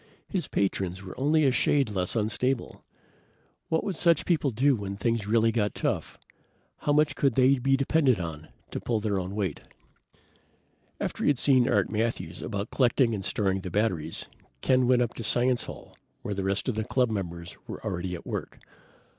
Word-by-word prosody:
His 185 -4 -2
patrons 95 -1 -1
were 95 - -8
only 150 +3 +3
a 135 - +4
shade 135 -2 +2
less 90 0 -1
unstable. 115 +4 -1 0.9
What 160 - +1
would 195 - -2
such 170 -1 +3
people 160 -5 +2
do 135 +4 +3
when 100 -2 -5
things 115 0 -1
really 115 +1 +3
got 105 -2 0
tough? - - -2 0.6
How 145 - -1
much 150 -1 +3
could 135 -5 +1
they 130 +1 +4
be 135 +2 +2
depended 135 - +2
on 80 -3 -6 0.2
to - - -3
pull 115 -2 -1
their 105 -2 -1
own 95 +2 -5
weight? 95 -8 -2 1.4
After - - -3
he - - +2
had 145 - +3
seen 130 -2 +4
Art 100 -1 +2
Matthews 110 -6 -2
about 100 -1 -4
collecting 125 -2 +3
and 100 -3 -3
storing 95 -1 0
the 95 - -5
batteries, 90 -5 -1 0.4
Ken 130 -1 +3
went 125 -1 +4
up 120 - -3
to 115 - -7
Science 125 +2 +2
Hall - - -10 0.3
where 105 - -3
the 100 -1 -3
rest 95 +5 -1
of 125 - +1
the 110 +1 -2
club 125 +1 +1
members 85 -5 -5
were - - -7
already 90 0 -3
at 85 - -10
work. - - -5
115 Hz, 185 wpm, -27 LUFS, 100-130 Hz, 1.4 s, a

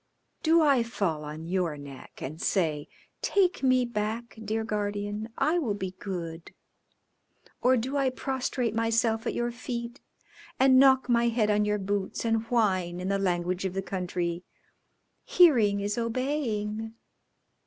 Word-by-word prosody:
"Do 325 0 +4
I 280 -5 +4
fall 195 -9 -2
on 155 +2 -7
your 175 -3 -1
neck 140 -2 -11
and 155 +5 -6
say, 155 -6 0 0.3
'Take 380 -2 +2
me 255 -2 +3
back, 225 +1 -3
dear 220 +1 -1
Guardian; 205 0 -3
I 335 +3 +2
will 230 -11 -1
be 190 -2 -4
good,' 170 -4 -6 1.1
or 255 +1 +4
do 260 +5 -2
I 270 -2 +2
prostrate 255 -3 -2
myself 225 0 +1
at - - -2
your 240 0 -1
feet 235 +1 -6 0.6
and 260 0 +6
knock 265 -1 +5
my 235 -1 +3
head 225 -2 +2
on 210 0 +2
your 210 0 +1
boots, 200 +2 -2
and 225 -1 +2
whine, 185 -7 +1
in 185 +1 -3
the 200 0 +1
language 180 -1 -1
of 190 -1 -3
the 195 - -2
country, 180 -2 -3 0.8
'Hearing 230 - +4
is 205 +3 -1
obeying'? 225 -3 -2
215 Hz, 145 wpm, -28 LUFS, 190-245 Hz, 1.1 s, and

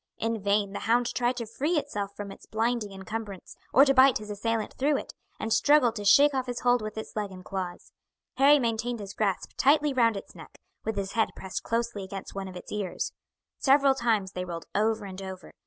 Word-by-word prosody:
In 225 -1 -2
vain 200 0 +1
the - - -4
hound 240 +1 +1
tried 245 +1 0
to 235 - -3
free 290 +10 -1
itself 205 -9 -3
from 205 -1 -6
its - - -13
blinding 225 -1 -1
encumbrance, 195 0 -7 0.2
or 275 +3 +7
to 275 - +4
bite 265 -1 +6
his 210 0 -8
assailant 225 +1 -2
through 285 +2 +1
it, - - -7 0.3
and 220 0 -1
struggled 285 -6 +4
to 205 - -5
shake 285 +8 +6
off 260 -1 -1
his 245 -1 -4
hold 245 -1 +3
with 215 0 -6
its 220 - -7
legs 210 -2 -2
and 185 -1 -11
claws. 185 -2 -5 0.5
Harry 280 +2 +7
maintained 235 -1 -1
his 200 -1 -7
grasp 200 -3 -1
tightly 295 +1 +4
round 230 -4 +3
its - - -9
neck, - - -13 0.3
with 220 - -2
his 195 -1 -3
head 225 -1 +1
pressed 190 -1 -5
closely 230 -3 -2
against 190 0 -7
one 195 -1 -5
of 185 - -9
its 180 - -9
ears. 210 - -3 0.5
Several 275 0 +5
times 225 -7 0
they 180 - -4
rolled 170 -2 -6
over 215 +1 +1
and 190 0 -8
over. 190 -1 -8
220 Hz, 215 wpm, -28 LUFS, 200-245 Hz, 0.5 s, or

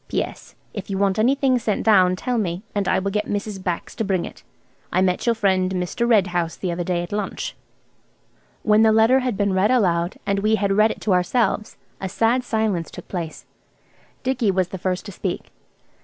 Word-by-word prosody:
"PS. - - -4 0.2
If 205 -1 -6
you 195 - -2
want 195 0 +1
anything 260 +2 +3
sent 220 -3 -1
down, 185 -4 +5
tell 245 +5 -1
me, 180 -2 -2
and 200 -2 -1
I - - +3
will 195 +1 -1
get 210 +1 -1
Mrs. 205 -1 -3
Bax 175 -2 -3
to 225 - -2
bring 190 -4 0
it. - - -11 0.5
I 180 - +2
met 185 +4 +1
your 235 - +4
friend 190 -3 +1
Mr. 180 +6 -1
Red 210 -5 +5
House 175 -2 -2
the 185 - -3
other 175 +1 -2
day 175 0 -1
at 175 - -8
lunch." 205 -1 -3 1.1
When 215 0 +4
the 220 0 +6
letter 225 +4 +5
had 250 -5 -2
been 200 -1 +1
read 190 +3 +3
aloud, 180 -8 +2
and 200 -1 +1
we 215 +2 +2
had 200 -2 0
read 215 +2 +4
it - - -6
to 205 - +1
ourselves, 210 +4 0 0.2
a 190 - -3
sad 230 +6 +2
silence 220 -8 -1
took - - -11
place. 170 -4 -5 0.8
Dicky 255 -4 +1
was 185 -2 +1
the 190 - -6
first 185 0 -2
to 205 - -7
speak. 185 -1 -4
200 Hz, 205 wpm, -22 LUFS, 185-220 Hz, 1.1 s, the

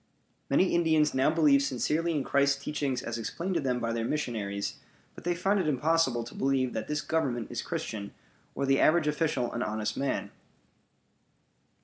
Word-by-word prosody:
Many 180 +7 +3
Indians 160 -3 +3
now 130 +2 +3
believe 150 -3 +4
sincerely 155 +5 0
in 145 -3 0
Christ's 140 0 +2
teachings 140 -4 -2
as 120 0 -4
explained 170 - -3
to 170 - +1
them 130 -4 0
by 115 -1 -1
their 115 -1 -1
missionaries, 110 -7 -3 0.3
but - - -13
they 175 0 +1
find 195 +4 +1
it 180 - 0
impossible 150 -3 +2
to 115 - -10
believe 135 -2 0
that 110 - -4
this 150 0 -1
Government 135 -8 -1
is - - -3
Christian, 100 -2 -4 0.4
or 140 - -1
the 135 0 +3
average 165 0 +4
official 150 -5 0
an 120 - -2
honest 110 -2 -2
man. 140 0 -2
140 Hz, 170 wpm, -29 LUFS, 120-160 Hz, 0.4 s, believe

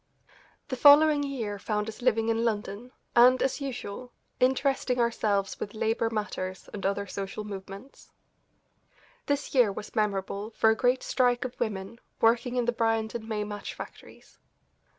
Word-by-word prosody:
The 260 - -2
following 290 +2 +7
year 235 -8 -3
found 210 +1 -2
us 220 +2 -8
living 225 -2 +2
in 225 0 +1
London, 215 +1 -3 0.2
and, 250 +2 +7
as 270 +2 -1
usual, 250 -3 -6 0.3
interesting 260 -1 +1
ourselves 210 -4 0
with 205 - -6
labour 225 +1 0
matters 190 -4 -4
and 200 - -6
other 200 +1 -1
social 200 +2 -5
movements. 200 +4 -10 1.2
This 285 0 -1
year 245 -6 +5
was 200 - -8
memorable 205 0 -2
for 220 - +5
a - - +2
great 250 +2 +1
strike 245 -1 +1
of 250 - -5
women 205 +2 -3 0.2
working 240 +2 +2
in 245 -1 +1
the 240 - +2
Bryant 225 -1 0
and 225 -1 -6
May 210 -1 -1
match 205 -1 -6
factories. - - -12
225 Hz, 150 wpm, -28 LUFS, 205-250 Hz, 1.2 s, following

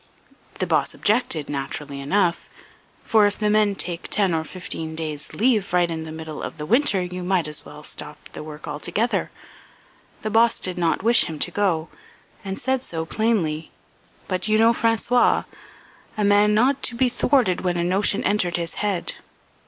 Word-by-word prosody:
The - - 0
boss - - +1
objected, 210 - +1
naturally 140 0 -4
enough; 175 +4 0 0.5
for 215 -2 +4
if 205 - -3
the 210 -1 +1
men 210 -1 +3
take 175 -2 -3
ten 195 -4 +2
or 160 -1 0
fifteen 160 -2 -5
days' 155 -2 -5
leave 220 -5 +1
right 175 -1 +3
in 160 -1 -4
the 160 - -7
middle 160 -1 -7
of - - -6
the 150 - -5
winter 220 - +3
you 180 0 -5
might 180 -2 +1
as 150 0 -5
well - - -11
stop - - -8 0.2
the - - -6
work 150 0 -9
altogether. 175 +10 -1 0.9
The 215 - -2
boss 230 +2 +4
did 185 -1 -2
not 170 +2 +1
wish 235 +2 +4
him 160 -2 -5
to 175 - 0
go 175 -5 0 0.6
and 195 -1 -4
said 260 0 0
so 160 -9 -4
plainly; 165 -7 0 0.6
but 185 +1 -2
you 215 0 +3
know 225 +1 +5
François 230 +2 +2 0.7
a 210 - +1
man 205 +1 +4
not 260 +5 +3
be 260 0 +3
thwarted 245 -7 +2
when 175 -1 0
a 170 - 0
notion 195 +3 +1
entered 180 -5 +1
his 170 -1 -3
head. 205 -4 -1
185 Hz, 175 wpm, -23 LUFS, 160-215 Hz, 0.9 s, know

